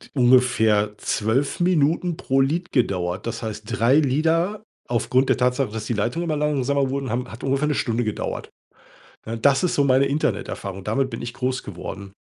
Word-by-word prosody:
ungefähr 110 -5 +3
12 115 +12 -1
Minuten 170 0 +1
pro 135 +1 +1
Lied 165 +6 -1
gedauert. 95 -5 -1
Das 115 +1 -4
heißt, 110 -1 -5
3 125 +2 +3
Lieder 165 +8 +1 0.2
aufgrund 125 +2 +1
der - - +3
Tatsache, 125 0 +1
dass 110 -1 -5
die 120 - -1
Leitungen 120 +10 -1
immer 155 - 0
langsamer 140 -2 +1
wurden, 135 -1 -3
haben 125 +2 -3
hat 115 - -10
ungefähr 135 +2 +1
'ne 150 - 0
Stunde 120 -3 0
gedauert. 110 -1 -4 0.8
Ne, 115 +1 -4
das 140 +7 +3
ist 180 - +1
so 145 - +3
meine 130 +1 +4
Interneterfahrung. 105 -8 -2
Damit 130 +6 0
bin 115 - -6
ich 120 0 -5
groß 130 0 -2
geworden. 100 0 -8
130 Hz, 175 wpm, -23 LUFS, 110-140 Hz, 0.8 s, meine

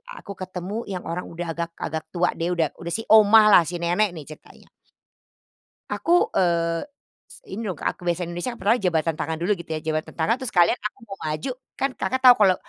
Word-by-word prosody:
aku 200 - -10
ketemu 185 +5 -5
yang 185 -2 -5
orang 170 +2 -5
udah 170 0 -5
agak 170 0 -4
agak 160 0 -4
tua 175 +1 +2
deh, 175 +1 -2
udah 160 -4 0
udah 170 0 -5
si 225 - -3
oma 220 0 +8
lah, 180 - +8
si 175 - -4
nenek 175 +3 0
nih, 155 - -7
ceritanya. 155 +2 -15 1.2
Aku, 350 +1 +2
eee, 170 -2 +1 0.5
s - - -13
ini 205 +4 -6
loh 185 - -3
Kak - - -3
aku - - -24
biasanya 175 0 -1
di - - -6
Indonesia 175 +7 -3
kan, 235 - -12
pertamanya 210 +1 +2
jabatan 165 -1 0
tangan 160 +1 -2
dulu, 180 - 0
gitu 170 - -10
ya, - - -3
jabatan 155 0 -2
tangan, 165 +7 +2
terus 260 - -3
sekalian 175 +6 +4
aku 210 +5 -5
mau - - -9
maju, 155 - -3 0.3
kan 275 - +1
Kakak 260 - -2
tau 250 - +11
kalau, 185 -2 +6
175 Hz, 220 wpm, -23 LUFS, 165-205 Hz, 1.2 s, tau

